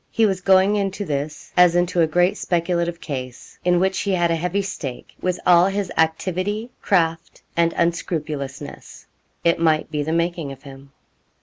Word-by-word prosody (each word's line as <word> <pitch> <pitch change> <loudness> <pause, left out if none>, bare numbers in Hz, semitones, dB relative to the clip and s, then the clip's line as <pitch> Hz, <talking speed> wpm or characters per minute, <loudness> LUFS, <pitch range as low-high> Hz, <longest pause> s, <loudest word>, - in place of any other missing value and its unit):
He 225 - +2
was 190 -3 0
going 190 +2 +4
into 200 0 -2
this 150 -1 -4
as 180 -1 +6
into 175 0 +2
a 160 - +4
great 175 +4 +2
speculative 170 -1 -1
case, 130 -6 -7
in 175 -1 +3
which 190 +1 +1
he 200 - -1
had 175 -2 +2
a - - +2
heavy 180 +4 -1
stake, 145 -10 -6
with 180 -1 -1
all 175 0 +6
his 195 -2 -2
activity, 185 +8 -1
craft, 165 -4 0
and 170 0 +3
unscrupulousness. 150 -4 -3 0.4
It 170 -1 +3
might 160 -2 +2
be 150 -2 -1
the 150 +2 -2
making 170 -3 -1
of 135 0 -11
him. 135 0 -13
170 Hz, 170 wpm, -22 LUFS, 155-185 Hz, 0.4 s, as